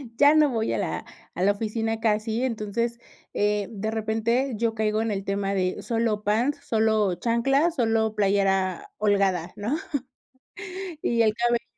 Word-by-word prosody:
ya 285 Hz, +4 st, +6 dB
no 310 Hz, -1 st, +5 dB
voy 225 Hz, -3 st, -1 dB
a -, -, 0 dB
la -, -, -2 dB, 0.3 s
a 180 Hz, -, -3 dB
la 200 Hz, -, +5 dB
oficina 225 Hz, +2 st, -2 dB
casi, 220 Hz, +1 st, 0 dB
entonces, 235 Hz, 0 st, -2 dB, 0.3 s
eh, 205 Hz, -1 st, +1 dB
de 220 Hz, 0 st, -3 dB
repente 225 Hz, +4 st, 0 dB
yo 230 Hz, +1 st, 0 dB
caigo 215 Hz, 0 st, 0 dB
en 225 Hz, -, -1 dB
el 195 Hz, -1 st, -3 dB
tema 195 Hz, 0 st, -1 dB
de 185 Hz, -1 st, -1 dB
solo 225 Hz, -2 st, -1 dB
pants, 235 Hz, +8 st, +1 dB
solo 220 Hz, -4 st, +2 dB
chanclas, 270 Hz, -, +1 dB
solo 225 Hz, -4 st, +1 dB
playera 195 Hz, -2 st, +1 dB
holgada, 195 Hz, -4 st, +1 dB
¿no?, 220 Hz, +8 st, -1 dB, 1.3 s
y 235 Hz, -1 st, +2 dB
el 215 Hz, -1 st, +2 dB
cabello 235 Hz, 0 st, +1 dB
220 Hz, 155 wpm, -25 LUFS, 205-235 Hz, 1.3 s, ya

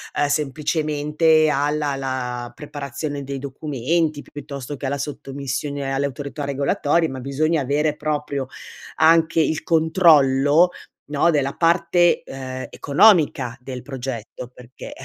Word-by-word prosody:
ehm, 145 Hz, -, +2 dB
semplicemente 150 Hz, +2 st, +1 dB
alla 145 Hz, 0 st, 0 dB
la 125 Hz, -2 st, -4 dB
preparazione 145 Hz, 0 st, -6 dB
dei 135 Hz, 0 st, -5 dB
documenti, 145 Hz, +3 st, -2 dB
piuttosto 145 Hz, -1 st, -8 dB
che 140 Hz, -, -6 dB
alla 140 Hz, -, -1 dB
sottomissione 140 Hz, 0 st, -4 dB
alle 140 Hz, +1 st, 0 dB
autorità 140 Hz, +2 st, -6 dB
regolatorie, 145 Hz, +4 st, +1 dB
ma 130 Hz, -1 st, -6 dB
bisogna 150 Hz, +4 st, 0 dB
avere 145 Hz, +3 st, 0 dB
proprio 145 Hz, -3 st, -3 dB, 0.5 s
anche 165 Hz, +1 st, +4 dB
il 155 Hz, 0 st, -1 dB
controllo, 160 Hz, -2 st, +4 dB, 0.4 s
no, 160 Hz, +4 st, +3 dB
della 140 Hz, -2 st, 0 dB
parte, 170 Hz, +1 st, +3 dB
ehm, 130 Hz, -1 st, -7 dB
economica 140 Hz, -, +3 dB
del 125 Hz, -1 st, -7 dB
progetto; 125 Hz, -3 st, -6 dB
perché 125 Hz, 0 st, -11 dB
145 Hz, 115 wpm, -21 LUFS, 135-155 Hz, 0.5 s, anche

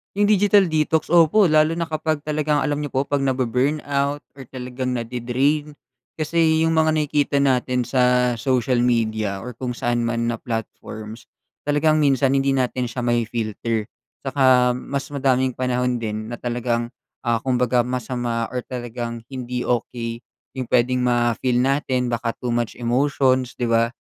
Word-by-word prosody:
'Yung 205 Hz, 0 st, +3 dB
digital 205 Hz, -2 st, +4 dB
detox, 155 Hz, 0 st, +1 dB
opo, 175 Hz, +4 st, +5 dB
lalo 155 Hz, 0 st, +4 dB
na 170 Hz, 0 st, -2 dB
kapag 155 Hz, -1 st, -1 dB
talagang 150 Hz, 0 st, 0 dB
alam 150 Hz, 0 st, -1 dB
niyo 145 Hz, -, -5 dB
po 135 Hz, +1 st, -1 dB
'pag 145 Hz, -1 st, 0 dB
nabu-burn 130 Hz, +2 st, 0 dB
out 140 Hz, +1 st, 0 dB, 0.2 s
or 135 Hz, -, -9 dB
talagang 125 Hz, 0 st, -4 dB
nade-drain 125 Hz, +5 st, -1 dB, 0.5 s
kasi 160 Hz, 0 st, +2 dB
'yung 165 Hz, -, +1 dB
mga 160 Hz, 0 st, +3 dB
nakikita 150 Hz, -2 st, +1 dB
natin 125 Hz, -2 st, +1 dB
sa 125 Hz, -1 st, +2 dB
social 125 Hz, 0 st, +1 dB
media 110 Hz, -4 st, 0 dB
or 125 Hz, +3 st, -8 dB
kung 125 Hz, 0 st, -4 dB
saan 120 Hz, 0 st, -1 dB
man 115 Hz, 0 st, -1 dB
na 120 Hz, -, 0 dB
platforms, 115 Hz, -1 st, -6 dB, 0.4 s
talagang 150 Hz, +2 st, +2 dB
minsan 135 Hz, -1 st, +3 dB
hindi 135 Hz, 0 st, +2 dB
natin 125 Hz, -2 st, -1 dB
siya 125 Hz, -, -5 dB
mafi-filter. 115 Hz, -2 st, -1 dB, 0.3 s
'Tsaka 130 Hz, -2 st, +3 dB
mas 135 Hz, +2 st, -4 dB
madaming 130 Hz, -2 st, +1 dB
panahon 125 Hz, 0 st, 0 dB
din 110 Hz, -2 st, -4 dB
na 120 Hz, -, -5 dB
talagang, 120 Hz, -1 st, -2 dB, 0.3 s
ah, 120 Hz, -2 st, +1 dB
kumbaga 125 Hz, 0 st, +1 dB
masama 120 Hz, -1 st, -2 dB
or 125 Hz, -, -2 dB
talagang 120 Hz, -2 st, -5 dB
hindi 125 Hz, -1 st, -4 dB
okey, 115 Hz, -1 st, -2 dB, 0.4 s
'yung 125 Hz, -, -3 dB
puwedeng 125 Hz, +1 st, +2 dB
ma-feel 120 Hz, +1 st, +1 dB
natin 130 Hz, -2 st, 0 dB
baka 115 Hz, 0 st, -2 dB
too 125 Hz, -, -4 dB
much 120 Hz, -1 st, -1 dB
emotions, 130 Hz, +1 st, +1 dB
'di 125 Hz, -, -4 dB
ba? 115 Hz, 0 st, +3 dB
125 Hz, 150 wpm, -22 LUFS, 120-140 Hz, 0.5 s, opo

